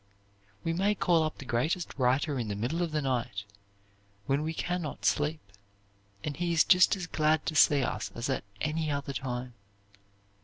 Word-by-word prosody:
We 165 - 0
may 200 +4 +2
call 175 -4 +3
up 155 -1 -2
the 135 - -9
greatest 145 +9 -1
writer 130 +2 +1
in 115 - -2
the 105 - -3
middle 125 +12 -2
of 170 -2 -1
the 150 -1 -1
night 120 -6 -1 0.8
when 140 +5 +1
we 155 +1 -2
can 175 +2 -2
not 150 -4 -6
sleep, 150 +2 +1 0.8
and 145 - -3
he 170 +2 -1
is 165 - +5
just 185 +2 +5
as 190 -2 -5
glad 155 -2 +1
to - - -1
see 145 -2 +5
us - - -2
as 120 +1 -3
at 135 - -1 0.2
any 155 +1 -1
other 140 -1 -2
time. 125 -2 -4
150 Hz, 185 wpm, -30 LUFS, 130-165 Hz, 0.8 s, is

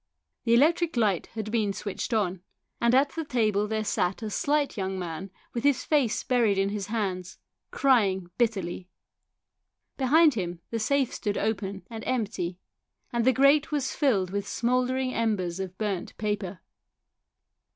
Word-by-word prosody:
The 230 0 +5
electric 320 +3 +3
light 205 -6 +2
had 215 -1 -4
been 215 -4 +1
switched 205 +5 -4
on, 190 -5 0 0.4
and 235 +1 +4
at 280 +2 +4
the 325 - -3
table 215 -7 +1
there 220 0 -1
sat 195 0 -1
a 215 - -3
slight 290 +5 +1
young 190 -1 -2
man 180 +1 -5 0.2
with 235 - -3
his 285 -3 +3
face 285 -7 +1
buried 235 -6 +2
in 195 0 +2
his 200 -1 -4
hands, 190 -5 -3 0.3
crying 195 -10 +2
bitterly. 190 -6 -1 1.1
Behind 300 +4 +5
him 175 -5 -3
the 230 - -1
safe 270 +3 +1
stood 205 -1 -2
open 200 -2 -2
and 225 -2 -7
empty, 205 -8 -2 0.6
and 235 -1 +1
the 260 - +6
grate 275 +4 +4
was 290 -3 -1
filled 200 - +1
with 200 0 -2
smoulder 250 +2 +1
ing 260 -1 -1
embers 195 -6 -1
of 185 -1 -5
burnt 205 -4 -3
paper. 205 -4 -3
215 Hz, 155 wpm, -27 LUFS, 195-255 Hz, 1.1 s, the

